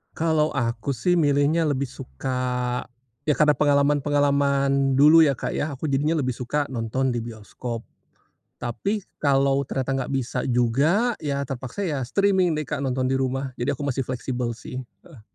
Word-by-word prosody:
Kalau 160 Hz, -1 st, +1 dB
aku 120 Hz, +1 st, -1 dB
sih 175 Hz, +9 st, +1 dB
milihnya 150 Hz, +1 st, +3 dB
lebih 140 Hz, -3 st, -1 dB
suka, 125 Hz, -, -3 dB, 0.4 s
ya 150 Hz, -, +3 dB
karena 150 Hz, 0 st, +3 dB
pengalaman-pengalaman 140 Hz, -1 st, +2 dB
dulu 155 Hz, +4 st, +7 dB
ya, 140 Hz, -, +3 dB
Kak, 125 Hz, -, -4 dB
ya 145 Hz, -1 st, -2 dB
aku 140 Hz, +3 st, -4 dB
jadinya 145 Hz, +4 st, +1 dB
lebih 130 Hz, -2 st, -2 dB
suka 145 Hz, +4 st, -2 dB
nonton 130 Hz, +1 st, -1 dB
di 120 Hz, -, -1 dB
bioskop, 115 Hz, +1 st, -6 dB, 0.8 s
tapi 200 Hz, -, -2 dB, 0.2 s
kalau 140 Hz, -1 st, +2 dB
ternyata 135 Hz, +1 st, -2 dB
nggak -, -, -5 dB
bisa 130 Hz, -2 st, -2 dB
juga 140 Hz, -, +2 dB
ya 140 Hz, -2 st, -2 dB
terpaksa 130 Hz, +4 st, -5 dB
ya 165 Hz, -7 st, -1 dB
streaming 190 Hz, +3 st, +2 dB
deh, 155 Hz, -, -1 dB
Kak, 150 Hz, 0 st, -4 dB
nonton 130 Hz, 0 st, 0 dB
di 135 Hz, -, +1 dB
rumah 135 Hz, 0 st, -2 dB
jadi 135 Hz, +4 st, 0 dB
aku 140 Hz, +1 st, -3 dB
masih 135 Hz, 0 st, -1 dB
fleksibel 125 Hz, -1 st, -3 dB
sih, 125 Hz, +2 st, -8 dB, 0.2 s
heeh. 145 Hz, -10 st, -16 dB
140 Hz, 160 wpm, -24 LUFS, 125-150 Hz, 0.8 s, dulu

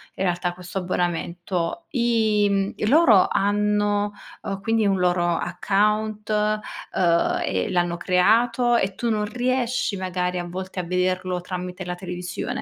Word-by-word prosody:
in -, -, -2 dB
realtà 175 Hz, 0 st, 0 dB
questo 180 Hz, +1 st, -6 dB
abbonamento 175 Hz, -, -2 dB
i 225 Hz, -5 st, +2 dB
mhmm, 195 Hz, 0 st, 0 dB, 0.2 s
loro 255 Hz, -, +6 dB
hanno, 205 Hz, 0 st, +1 dB, 0.3 s
uhm, 195 Hz, -1 st, -4 dB
quindi 225 Hz, +1 st, +1 dB
un 195 Hz, -2 st, +2 dB
loro 180 Hz, -1 st, +2 dB
account, 210 Hz, +4 st, 0 dB, 0.6 s
uhm, 170 Hz, -2 st, +2 dB
e 95 Hz, -1 st, -1 dB
l'hanno 175 Hz, -1 st, +1 dB
creato 230 Hz, +8 st, +3 dB
e 195 Hz, -4 st, 0 dB
tu 235 Hz, +4 st, -2 dB
non 215 Hz, -2 st, 0 dB
riesci 245 Hz, -1 st, -1 dB
magari 180 Hz, -1 st, -2 dB
a 175 Hz, -, -3 dB
volte 185 Hz, +1 st, -5 dB
a -, -, -8 dB
vederlo 180 Hz, +1 st, -1 dB
tramite 180 Hz, +1 st, -6 dB
la 180 Hz, 0 st, -3 dB
televisione? 180 Hz, 0 st, -6 dB
190 Hz, 140 wpm, -23 LUFS, 180-210 Hz, 0.6 s, loro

